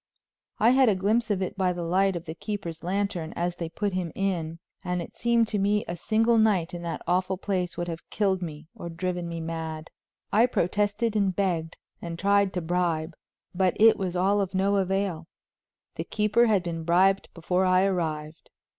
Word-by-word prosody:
I 230 +3 +5
had 260 -2 +5
a 205 - +3
glimpse 220 +5 +1
of 195 -2 0
it 185 - -4
by 185 -2 +1
the 175 -1 -4
light 190 +3 +2
of 170 - -5
the 160 - -5
keeper's 170 -3 -5
lantern 180 -3 -2
as 175 0 -2
they 165 -2 -4
put 200 +3 -2
him 180 -3 -2
in, 170 -5 -2 0.3
and 180 0 -1
it 170 - -7
seemed 235 -1 +2
to 210 - -1
me 205 +2 +1
a 170 - -3
single 225 +5 +2
night 200 -7 +2
in 175 - -5
that 170 -1 -5
awful 185 +2 0
place 185 -2 -2
would 175 - -2
have 165 -1 -7
killed 195 -3 0
me 155 -2 -7
or 170 - -7
driven 175 0 -3
me 165 0 -4
mad. 160 -1 -5 0.4
I 225 +4 +5
protested 205 +2 0
and 195 -3 +1
begged 170 -5 -1 0.2
and 170 -1 -5
tried 200 +1 +3
to 180 - -2
bribe, 165 -1 -1 0.4
but 185 -1 +1
it 225 +1 +7
was 185 -3 -3
all 195 +3 +2
of 195 -1 -3
no 200 +2 +2
avail; 190 -3 -1 0.7
the - - -2
keeper 215 +3 +2
had 205 -5 +2
been 165 -2 -4
bribed 185 +4 +3
before 180 +2 0
I 185 0 +4
arrived. 160 -5 -2
185 Hz, 195 wpm, -26 LUFS, 170-200 Hz, 0.7 s, it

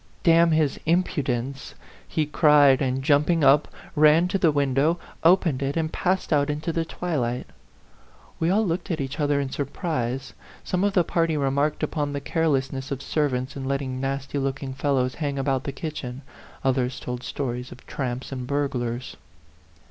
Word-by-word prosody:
D 170 - +5
n 165 +1 +5
his 155 -3 +1
impudence!" 135 -6 -1 0.3
he 155 - 0
cried, 145 -3 +5
and, 130 0 0
jump 145 +2 +3
ing 165 -3 +2
up, 140 +2 +5 0.3
ran 155 +3 +5
to 195 - 0
the 165 -4 +4
window, 145 +3 +2 0.3
opened 165 -5 +4
it, 140 +3 -1
and 160 -1 -1
passed 185 -2 0
out 145 0 +2
into 150 +3 -2
the 165 - 0
twilight. 140 -8 -2 0.9
We 165 - +1
all 215 +4 +3
looked 175 +2 -2
at 165 -3 -1
each 140 +2 -4
other 145 -1 +2
in 135 -2 -2
surprise; 135 -3 -3 0.3
some 185 +1 -1
of 205 -1 +2
the 180 - +4
party 165 -1 0
remarked 140 +2 0
upon 145 -2 -1
the 140 - -2
carelessness 135 -3 -1
of 140 - -3
servants 135 -3 -1
in 135 -1 -5
letting 135 -1 -2
nasty 135 +1 -2
looking 135 0 -3
fellows 130 -2 0
hang 140 -2 -1
about 135 -1 0
the 140 - -2
kitchen, 140 -3 -6 0.4
others 130 -1 0
told 125 0 -5
stories 125 -2 -4
of 125 - -13
tramps 130 -1 -4
and 130 -2 -5
burglars. 125 -4 -2
140 Hz, 170 wpm, -25 LUFS, 130-160 Hz, 0.9 s, D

